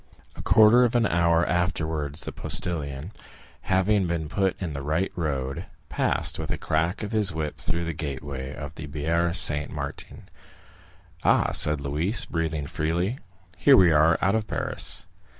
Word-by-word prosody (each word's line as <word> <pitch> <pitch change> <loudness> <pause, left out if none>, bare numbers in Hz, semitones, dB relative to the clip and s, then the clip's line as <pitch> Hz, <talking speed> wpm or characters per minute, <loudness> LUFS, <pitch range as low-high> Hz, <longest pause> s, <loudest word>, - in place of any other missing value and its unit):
A - - -8
quarter 110 +3 +5
of 120 0 +1
an 120 -2 +3
hour 85 -2 +2
afterwards 80 -4 -2
the - - -6
postilion, 75 0 -1 0.6
having 95 +1 +2
been 80 -3 -3
put 95 0 -1
in 90 -4 -4
the 70 - -5
right 80 +7 -1
road, 70 -1 -3 0.2
passed - - +1
with - - -5
a - - -2
crack 80 +7 -1
of 105 - -5
his 105 -4 +2
whip 75 -2 -4
through 85 0 -2
the 85 - -3
gateway 70 -3 -6
of 75 0 -8
the 80 -1 -8
Barrière 85 +3 -1
Saint 75 -5 +3
Martin. - - -7 1.0
"Ah," - - +3
said 75 -1 +3
Louise, 75 - +1
breathing 80 -3 -3
freely, 85 - -2 0.4
"here 140 -2 +6
we 90 -3 +6
are 80 +1 +4
out 100 - +3
of 110 -1 -1
Paris." - - -2
80 Hz, 160 wpm, -25 LUFS, 75-95 Hz, 1.0 s, here